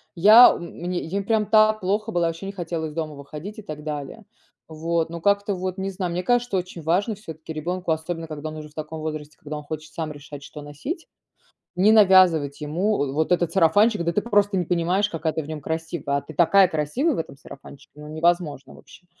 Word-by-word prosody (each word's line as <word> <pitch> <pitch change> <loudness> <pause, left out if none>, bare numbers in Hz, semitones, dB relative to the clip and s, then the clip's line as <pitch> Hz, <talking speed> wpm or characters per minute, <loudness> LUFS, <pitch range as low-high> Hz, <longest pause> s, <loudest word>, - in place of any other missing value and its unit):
я 215 +8 +9
м - - -7
мне 180 +1 -3
я 185 +5 -3
им - - -4
прям 215 +1 +1
так 215 0 +4
плохо 210 +4 -1
было 175 -4 +1
я, - - +3
вообще, 165 +4 -5
не - - -4
хотела 170 -4 -4
из 150 - -9
дома 155 -2 -4
выходить 150 +9 -9
и - - -7
так 155 -5 -8
далее. 150 +8 -6 0.4
Вот, 165 +1 -2
ну 170 0 -7
как-то 200 +1 +1
вот, 185 +1 -4
не 190 0 -2
знаю, 185 -2 -3
мне 175 +1 -2
кажется, 245 0 +1
очень 180 -1 -5
важно 185 +8 0
всё-таки 160 -6 -9
ребенку, 175 +3 -3
особенно 165 +1 -3
когда 155 0 -6
он 155 - -8
уже 155 0 -8
в - - -24
таком 155 +1 -6
возрасте, 155 -2 -6
когда 150 0 -7
он 150 - -8
хочет 155 +1 -7
сам 160 -2 -4
решать 145 -1 -10
что 150 - -10
носить, 150 - -6 0.7
не 200 +4 +5
навязывать 185 -9 +5
ему, 170 +4 0
э, 135 - -4
вот 155 +2 0
этот 175 -2 +2
сарафанчик, 205 +3 +4
да: 170 0 0
"Ты 210 - 0
просто 205 -3 +2
не 180 - +1
понимаешь, 180 +4 +1
какая 160 -2 -2
ты 160 - -2
в - - -10
нём 155 0 -6
красивая. 160 -2 -3
А 140 - -2
ты 155 - -11
такая 185 +5 +5
красивая 170 - 0
в - - -4
этом 160 - -5
сарафанчике! 140 -1 -14
Ну, 150 - -9
невозможно, 155 -3 -1
вообще!" 180 - -17
170 Hz, 225 wpm, -23 LUFS, 155-195 Hz, 0.7 s, я